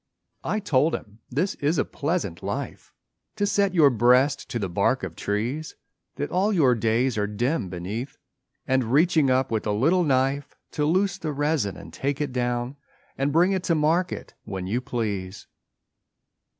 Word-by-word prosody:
I 215 - -1
told 155 -5 +2
him 105 +1 -10
this 165 +10 0
is 150 +4 +1
a - - +2
pleasant 145 - -2
life - - -5 0.4
To 205 -2 0
set 200 -2 +1
your 150 -5 +6
breast 125 +5 +3
to 120 - -2
the 100 -4 -2
bark 100 +8 +1
of 85 -4 -5
trees 120 - -3 0.4
That 145 - -4
all 195 +4 +2
your 150 -11 +4
days 115 +1 +1
are 105 - 0
dim 115 - -1
beneath, 100 +9 -5 0.5
And 130 -1 +2
reaching 155 0 +4
up 130 0 +2
with 110 -1 -1
a - - +1
little 160 - +3
knife, 135 -1 0 0.2
To 150 - -1
loose 190 +4 +1
the 155 -4 -3
resin 145 - 0
and - - -11
take 140 0 -2
it 145 -3 -2
down 125 +1 -1 0.4
And 135 +2 0
bring 175 +5 +4
it 190 -1 0
to 170 - +2
market 165 +4 0
when 95 -2 -5
you 115 +7 -1
please. 105 -6 -4
135 Hz, 170 wpm, -25 LUFS, 115-160 Hz, 0.5 s, your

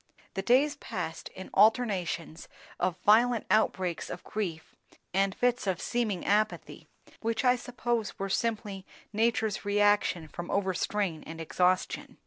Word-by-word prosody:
The 195 - -2
days 275 +7 +3
passed 165 - -5
in 185 - -9
alternations 195 -8 +2 0.3
of 180 0 0
violent 230 +2 +5
outbreaks 185 -5 +1
of 180 - -7
grief 175 -7 -4 0.4
and 195 0 +2
fits 245 -2 +1
of 185 -1 0
seeming 220 -7 -1
apathy, 215 +1 0 0.3
which 230 +3 -1
I 250 0 +6
suppose 240 -3 -2
were 195 - -2
simply 205 -2 -2 0.3
nature's 220 -1 +1
reaction 205 -4 +2
from 175 +2 -7
overstrain 190 -3 -1
and 165 0 -8
exhaustion. 180 +3 0
205 Hz, 125 wpm, -29 LUFS, 185-230 Hz, 0.4 s, I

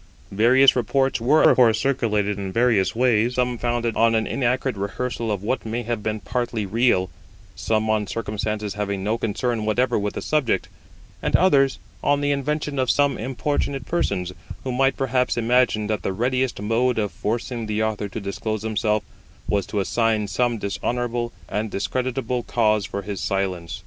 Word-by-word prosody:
Various 125 +6 +5
reports 135 +2 +1
were 145 +7 +4
of - - +5
course 115 -3 +5
circulated 105 -7 0
in 95 -1 -4
various 115 -4 +2
ways; 120 0 +2
some 125 -1 0
founded 120 -1 -1
on 115 0 +3
an 110 0 +1
inaccurate 130 -1 0
rehearsal 110 +3 -3
of 100 -2 -3
what 130 +5 -1
may 115 +2 -3
have 115 -1 -3
been 110 +1 -2
partly 120 +1 -2
real, 100 -3 +2 0.4
some 110 0 0
on 110 -2 +1
circumstances 105 -1 -3
having 100 -2 -3
no 110 +3 0
concern 115 +1 -1
whatever 120 +2 +1
with 105 0 -3
the - - -3
subject, 150 -6 0 0.5
and - - +1
others 140 -7 +4 0.3
on 145 0 +3
the 145 0 +1
invention 145 0 -1
of 130 -2 +1
some 145 -2 +3
importunate 135 +2 -2
persons, 90 - -1 0.3
who 130 - -3
might 135 +2 +2
perhaps 125 -2 0
imagine 120 -2 +2
that 105 -2 -1
the 95 - -2
readiest 125 +4 0
mode 115 +4 +1
of 105 -2 0
forcing 115 +1 -3
the 105 +1 0
Author 105 -2 -2
to 105 - -5
disclose 110 +2 -4
himself 110 -1 0 0.4
was 100 -2 0
to 105 - -2
assign 110 +1 +1
some 120 +2 0
dishonourable 120 +3 -2 0.2
and 105 +1 -2
discreditable 125 +3 -2
cause 110 -4 +1
for 100 - -5
his 100 -1 -5
silence. 95 -3 -2
115 Hz, 170 wpm, -23 LUFS, 105-125 Hz, 0.5 s, Various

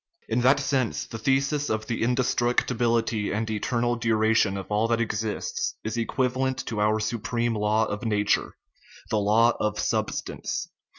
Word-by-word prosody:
In 120 +2 0
that 135 +3 +5
sense 135 -4 0
the 115 - -8
thesis 135 +4 +1
of 110 0 -1
the 120 - -3
indestruc 120 0 +1
tibility 115 -3 0
and 110 +2 -1
eternal 120 +3 0
duration 110 -3 +2
of 95 - -5
all 105 +2 +2
that 115 0 +1
exists 110 -2 -2
is 110 +1 -3
equiva 125 +2 0
lent 130 0 -1
to 110 -2 -2
our 105 +1 +2
supreme 115 +2 -1
law 105 +1 +2
of 105 +1 -4
nature, 105 -2 +1 0.6
the 110 - +2
law 110 +3 +4
of 105 -1 -1
substance - - -2
(see - - -14
chap. - - -46
115 Hz, 170 wpm, -26 LUFS, 110-120 Hz, 0.6 s, that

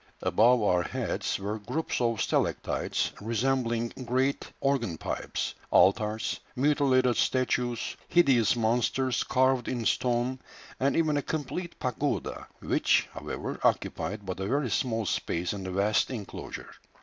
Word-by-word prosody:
Above 120 +1 +4
our 90 -3 +3
heads - - -2
were 105 +3 -4
groups 155 +7 -2
of 115 -2 +1
stalactites - - 0
resembling 115 +1 0 0.2
great 130 +3 0
organ 120 -11 0
pipes, - - -3 0.2
altars, 105 +3 +3 0.2
mutilated 130 -3 +3
statues, 125 -2 0
hideous 135 - +4
monsters 120 +2 +1
carved 130 -1 +2
in 120 -3 -2
stone, 125 +2 +1 0.4
and 135 +2 +2
even 155 -3 +2
a - - +1
complete 160 +4 -4
pagoda, 140 +2 -2
which, - - +2
however, - - -5
occupied 105 0 0
but 95 0 -4
a 95 - -2
very 135 0 0
small 115 -3 0
space 90 -1 -1
in 100 - -5
the 95 - -4
vast 100 +3 +2
enclosure. 115 -7 -7
120 Hz, 125 wpm, -28 LUFS, 110-135 Hz, 0.4 s, Above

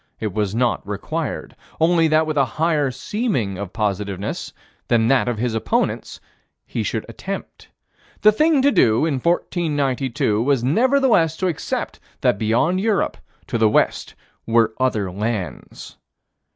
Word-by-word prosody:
It 105 -4 -3
was 105 -1 -1
not 120 -4 0
required: 130 +8 -4 0.2
only 165 0 +4
that 155 0 +3
with 155 -1 -2
a 140 - +4
higher 155 -3 +2
seeming 130 - -2
of 100 -3 -5
positiveness 100 -2 -3 0.4
than 115 -1 +3
that 135 -2 +3
of 120 -2 -1
his 120 +1 -1
opponents, 165 - -1 0.5
he - - -3
should - - -2
attempt. - - -7 0.5
The 215 - +7
thing 300 +4 +3
to 285 - +5
do, 115 - +3
in 145 -5 0
1492, 140 - 0
was 135 -1 +1
nevertheless 225 - +3
to 185 - 0
accept 165 -5 -3 0.2
that 100 - +2
beyond 120 - +1
Europe, 215 -2 +1 0.3
to 115 - -2
the 110 -1 +4
west, - - 0 0.3
were 115 -1 +3
other 110 -7 0
lands. 105 -1 -5
130 Hz, 140 wpm, -21 LUFS, 110-165 Hz, 0.5 s, The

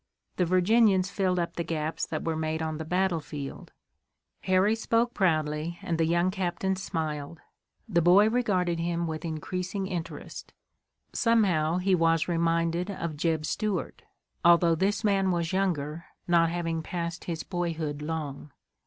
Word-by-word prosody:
"The 180 - +2
Virginians 190 +2 +3
filled 185 -3 0
up 170 -1 -2
the 170 - 0
gaps 160 -1 -2
that 155 - -4
were 165 -1 0
made 160 0 -2
on 155 -1 -3
the - - -3
battlefield." 160 -5 -2 0.7
Harry 185 +3 +3
spoke 230 +1 +1
proudly, 155 -2 0
and 165 -1 -2
the 165 - +3
young 170 +2 +2
captain 190 0 -1
smiled. 160 -4 -4 0.5
The 175 -6 +2
boy 185 +5 +6
regarded 190 -8 +1
him 170 0 -1
with 160 0 -4
increasing 180 +4 -3
interest. 175 -3 -6 0.6
Somehow 185 -9 +2
he 190 +1 +1
was 165 -2 +3
reminded 170 +1 0
of 170 -5 -4
Jeb 160 0 0
Stuart, 210 0 -2 0.4
although 170 0 +6
this 195 +6 0
man 195 -2 +2
was 170 -1 -1
younger, 170 -4 -1 0.2
not 170 -1 +4
having 165 -1 -2
passed 170 +1 -4
his 165 -2 -3
boyhood 165 -5 -3
long. 150 -2 -5
170 Hz, 145 wpm, -28 LUFS, 160-185 Hz, 0.7 s, boy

